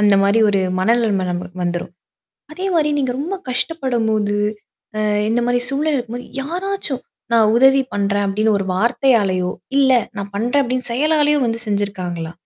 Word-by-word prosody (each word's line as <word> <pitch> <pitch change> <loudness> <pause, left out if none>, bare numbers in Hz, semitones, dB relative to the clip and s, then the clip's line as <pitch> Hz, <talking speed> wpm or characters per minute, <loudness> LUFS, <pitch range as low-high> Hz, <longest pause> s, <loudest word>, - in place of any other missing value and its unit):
அந்த 205 -1 +5
மாரி 200 +3 +3
ஒரு 200 -1 +2 0.2
மனநிலம 210 -2 +2
நமக்கு 180 +1 -5
வந்துரும். 175 0 -3 0.6
அதே 370 +5 -4
மாரி 300 -2 +2
நீங்க 260 -3 0
ரொம்ப 325 +8 -3 0.2
கஷ்டப்படும் 255 -4 -1
போது, 205 -1 0 0.6
அ - - -1 0.3
இந்த 235 +2 +1
மாரி 245 0 +1
சூழ்நிலை 295 +2 0
இருக்கும் 240 -1 -4
போது 245 - -8 0.2
யாராச்சும், 355 -3 -4 0.3
"நான் 220 -2 +4
உதவி 270 +2 +5
பண்றேன்" 200 0 0
அப்டின்னு 210 +1 +1
ஒரு 195 - -3
வார்த்தையாலேயோ 210 -5 +2 0.3
இல்ல 270 -1 +4 0.3
நான் 200 0 -6
பண்றேன் 245 +7 +1
அப்டின்னு 250 -1 -2
செயலாலேயோ 295 +2 +2
வந்து 230 0 -2
செஞ்சுருக்காங்களா? 185 -5 -3
230 Hz, 155 wpm, -19 LUFS, 200-270 Hz, 0.6 s, அந்த